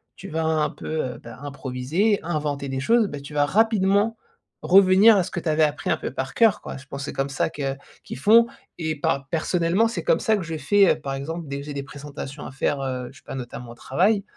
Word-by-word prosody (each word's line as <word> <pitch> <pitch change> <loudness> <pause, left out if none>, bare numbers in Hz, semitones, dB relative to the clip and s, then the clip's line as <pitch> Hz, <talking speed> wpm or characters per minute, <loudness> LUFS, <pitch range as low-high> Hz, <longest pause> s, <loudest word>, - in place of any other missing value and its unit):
tu 195 - -10
vas 160 +1 -1
un 155 -1 +1
peu, - - -10 0.2
heu, 125 - -5
bah, 115 -1 -10
improviser, 145 - -1
et - - -10
inventer 150 -4 -2
des 135 0 -3
choses. 225 - +3
Bah, 145 - -6
tu 145 +2 -10
vas 145 0 +3
rapidement 210 +3 +2 0.5
revenir 195 +3 +7
à 190 - +3
ce 175 - -6
que 190 - -4
tu 165 - -3
avais 155 0 +3
appris 150 -1 0
un - - +2
peu - - -4
par 130 0 -4
cœur, 225 -4 +4
quoi. - - -7
Je 140 +1 -13
pense 140 0 -6
c'est - - -5
comme 135 +1 -1
ça 140 - 0
que 135 -3 -3 0.3
qu'ils - - -7
font 225 - +6 0.3
et 160 -2 -2
pa 140 -1 0
personnellement, 170 +5 +1
c'est 230 - -4
comme - - +3
ça 220 - +2
que 205 - -2
je 165 -1 -4
fait, 195 +6 +4
heu, - - -16
par 140 -2 -4
exemple, 160 +4 -5
dès 140 0 -4
que 140 - -6
j'ai 145 - -6
des 140 - -3
présentations 145 0 -8
à - - -9
faire, 135 +1 -1
heu, 130 -2 -3
je 140 - -17
sais - - -19
pas, - - -7
notamment 120 -1 -7
au - - -11
travail. 195 - +1
150 Hz, 255 wpm, -24 LUFS, 140-190 Hz, 0.5 s, revenir